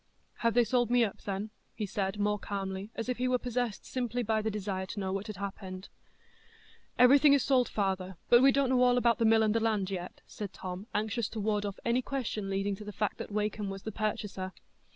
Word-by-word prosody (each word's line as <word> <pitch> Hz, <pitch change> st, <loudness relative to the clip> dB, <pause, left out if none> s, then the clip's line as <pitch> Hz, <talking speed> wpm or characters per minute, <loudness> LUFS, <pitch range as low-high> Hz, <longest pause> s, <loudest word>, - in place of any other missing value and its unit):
"Have 230 Hz, -1 st, +1 dB
they 240 Hz, -, +6 dB
sold 240 Hz, 0 st, +1 dB
me 245 Hz, 0 st, +4 dB
up, 205 Hz, -, -3 dB
then?" 200 Hz, +2 st, -3 dB, 0.2 s
he 215 Hz, -, -2 dB
said 195 Hz, 0 st, -2 dB
more 210 Hz, 0 st, +1 dB
calmly, 195 Hz, 0 st, -4 dB
as 230 Hz, -, -4 dB
if 250 Hz, -1 st, -2 dB
he 255 Hz, -, +1 dB
were 255 Hz, 0 st, +3 dB
possessed 245 Hz, -3 st, -2 dB
simply 245 Hz, -1 st, -2 dB
by 220 Hz, 0 st, +1 dB
the 220 Hz, -, -1 dB
desire 195 Hz, -3 st, -3 dB
to 205 Hz, -, -5 dB
know 190 Hz, -1 st, -2 dB
what 195 Hz, +2 st, -3 dB
had 215 Hz, -, -5 dB
happened. 190 Hz, -1 st, -6 dB, 1.1 s
"Everything 280 Hz, +4 st, +7 dB
is 280 Hz, -, +4 dB
sold, 255 Hz, -3 st, +3 dB
father; 190 Hz, -3 st, -2 dB
but 240 Hz, 0 st, +7 dB
we 270 Hz, +1 st, +7 dB
don't 275 Hz, -1 st, +2 dB
know 255 Hz, -1 st, +3 dB
all 250 Hz, 0 st, +5 dB
about 240 Hz, 0 st, +3 dB
the 230 Hz, -, +3 dB
mill 220 Hz, 0 st, +5 dB
and 215 Hz, -1 st, +2 dB
the 230 Hz, -, +2 dB
land 215 Hz, -4 st, 0 dB
yet," 180 Hz, -1 st, -5 dB
said 205 Hz, -3 st, -7 dB
Tom, 185 Hz, +3 st, -6 dB
anxious 215 Hz, +1 st, 0 dB
to 225 Hz, -, -6 dB
ward 210 Hz, 0 st, 0 dB
off 200 Hz, -, -6 dB
any 235 Hz, +2 st, +2 dB
question 235 Hz, -7 st, -3 dB
leading 195 Hz, +1 st, 0 dB
to 210 Hz, -, -8 dB
the 210 Hz, -, -6 dB
fact 210 Hz, 0 st, -2 dB
that -, -, -5 dB
Wakem 210 Hz, -1 st, -1 dB
was 195 Hz, 0 st, -6 dB
the 220 Hz, -, -4 dB
purchaser. 205 Hz, -3 st, -3 dB
215 Hz, 230 wpm, -31 LUFS, 195-240 Hz, 1.1 s, Everything